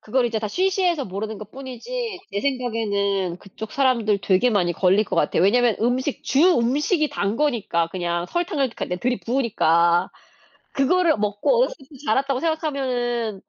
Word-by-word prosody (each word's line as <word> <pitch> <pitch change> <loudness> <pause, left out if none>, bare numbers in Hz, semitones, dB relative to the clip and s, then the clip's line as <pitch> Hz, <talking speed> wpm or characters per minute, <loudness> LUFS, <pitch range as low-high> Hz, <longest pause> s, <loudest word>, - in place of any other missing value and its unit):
그거를 245 +3 0
이제 225 -1 -2
다 215 -1 -3
쉬쉬해서 365 - +1
모르는 210 +2 -5
것 210 0 -10
뿐이지 365 - -6
제 200 - -1
생각에는 205 -8 -1
그쪽 210 +3 -9
사람들 235 -7 +2
되게 195 +6 +3
많이 180 -5 +1
걸릴 190 +4 +3
것 - - -4
같아요. - - +1
왜냐하면 235 +4 +3
음식 255 +4 -1
주 275 - +1 0.2
음식이 295 +6 +1
단 200 +2 -2
거니까 230 - 0
그냥 175 -1 -2
설탕을 330 - -1
그러니까 - - -5
네 180 - -3
들이부으니까 185 -8 +1 0.6
그거를 330 +2 +2
먹고 205 - +1
어렸을 - - +1
때부터 275 0 -16
자랐다고 265 +3 +1
생각하면은 250 - -2
240 Hz, 385 characters per minute, -22 LUFS, 200-280 Hz, 0.6 s, 되게